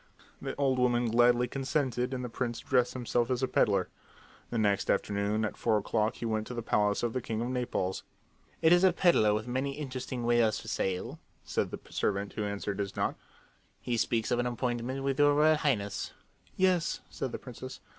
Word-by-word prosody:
The - - -4
old 135 -2 +1
woman 120 -2 +2
gladly 120 +1 +4
consented, 130 -1 -1
and 125 -1 -3
the - - -2
prince 120 0 -3
dressed 125 -2 +1
himself 120 -1 0
as 130 0 0
a - - +3
peddler. 100 -6 +2 0.6
The 120 - -2
next 100 -3 +1
afternoon 105 +2 +1
at 105 - -4
four 110 -2 +2
o'clock 105 +2 0
he - - -5
went 110 -1 -1
to 125 - -6
the 120 - -3
palace 105 -1 +1
of 120 -1 0
the 130 - -1
king 110 -1 -3
of 120 +2 -2
Naples. 120 -7 -2 0.6
"It 160 +1 +7
is 175 +1 +5
a 185 -2 +6
peddler 170 - +4
with 110 +1 -2
many 130 +3 -1
interesting 130 -3 -5
wares 115 -2 +3
for - - -11
sale," 95 -1 -2 0.3
said - - -1
the - - -6
servant 100 0 -1
who 110 - -3
answered 100 0 -3
his 100 -1 -3
knock. - - 0 0.6
"He 120 - -2
speaks 115 -1 0
of 120 - +2
an 120 - +1
appointment 125 +2 -2
with 135 0 -1
your 145 0 +5
Royal 155 +1 +5
Highness." 105 -10 -1 0.4
"Yes," 185 -3 +2
said 130 - -4
the - - -4
princess. 130 0 -9
120 Hz, 195 wpm, -30 LUFS, 110-130 Hz, 0.6 s, It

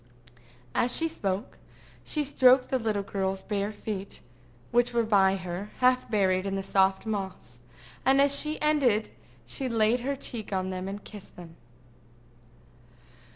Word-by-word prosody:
As 245 +1 +1
she 330 - +2
spoke, 200 -11 -4 0.4
she 300 - 0
stroked 260 -2 +4
the 260 - +2
little 215 -3 -1
girl's 190 -1 -2
bare 205 -1 -2
feet, 205 -2 -6 0.5
which 240 0 +2
were 235 - +3
by 195 -3 +4
her, 185 +2 -5
half 255 0 +2
buried 190 -3 +1
in 195 - -2
the 195 - -2
soft 190 +1 +2
moss, 190 - -5 0.4
and 265 +1 +4
as 280 0 +4
she 305 +2 0
ended 270 -8 +2 0.3
she 265 -3 -3
laid 225 +1 +2
her 275 +3 -2
cheek 235 -6 -5
on 190 -1 -1
them 185 0 -4
and 200 +1 -6
kissed 205 -3 -12
them. 170 -2 -12
210 Hz, 150 wpm, -28 LUFS, 190-250 Hz, 0.5 s, stroked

